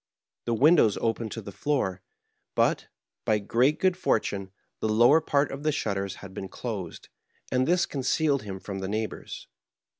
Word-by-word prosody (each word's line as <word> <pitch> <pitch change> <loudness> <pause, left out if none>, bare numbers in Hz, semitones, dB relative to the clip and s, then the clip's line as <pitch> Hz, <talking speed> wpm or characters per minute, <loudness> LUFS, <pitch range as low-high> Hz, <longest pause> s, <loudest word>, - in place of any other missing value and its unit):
The 120 - 0
windows 140 - +5
opened 115 -1 -1
to 115 - -6
the 100 - -8
floor; 95 -8 -1 0.5
but, - - +2 0.4
by 105 - +2
great, 120 +8 +2
good 185 -1 +3
fortune, 100 - 0 0.3
the 110 - -1
lower 120 +9 +6
part 145 -2 +1
of 135 - -6
the 155 +1 +1
shutters 100 -7 -2
had 95 - -10
been 95 - -5
dosed, 100 -6 -6 0.4
and 130 +1 +2
this 180 +1 +3
concealed 140 +1 +1
him 95 -2 -6
from 95 0 -6
the 95 - -3
neighbors. 110 +1 -4
115 Hz, 160 wpm, -27 LUFS, 100-140 Hz, 0.5 s, lower